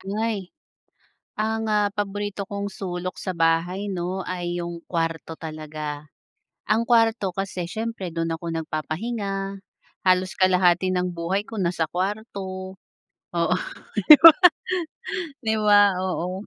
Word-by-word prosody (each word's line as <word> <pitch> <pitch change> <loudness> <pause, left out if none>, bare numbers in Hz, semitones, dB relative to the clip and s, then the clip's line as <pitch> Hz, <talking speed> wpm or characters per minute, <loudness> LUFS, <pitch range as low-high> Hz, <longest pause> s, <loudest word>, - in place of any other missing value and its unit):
Buhay. 205 -1 -2 0.9
Ang, 220 +1 -1
ah, 210 -1 +3
paborito 205 -1 -3
kong 200 0 -3
sulok 185 -1 -5
sa 185 - -3
bahay 170 +5 +1
'no, 185 +1 -3
ay 175 -1 -3
yung 170 0 -5
kuwarto 165 -1 -2
talaga. 155 -2 -6 0.6
Ang 215 +2 +2
kuwarto 225 -4 +3
kasi 190 -3 -3
siyempre, 220 -3 -4
dun 165 0 -2
ako 165 +1 -6
nagpapahinga, 195 +5 -3 0.4
halos 185 0 +3
kalahati 185 -1 +3
ng 180 -1 -1
buhay 180 +5 -2
ko 220 -2 -5
nasa 170 -2 0
kuwarto 190 -1 -4 0.6
Oo, 170 +1 +2 0.6
di 305 - +14
ba? 330 0 +11 1.1
'Di 220 0 +2
ba? 205 -1 +6 0.2
Oo. 185 +1 -3
185 Hz, 120 wpm, -24 LUFS, 170-205 Hz, 1.1 s, di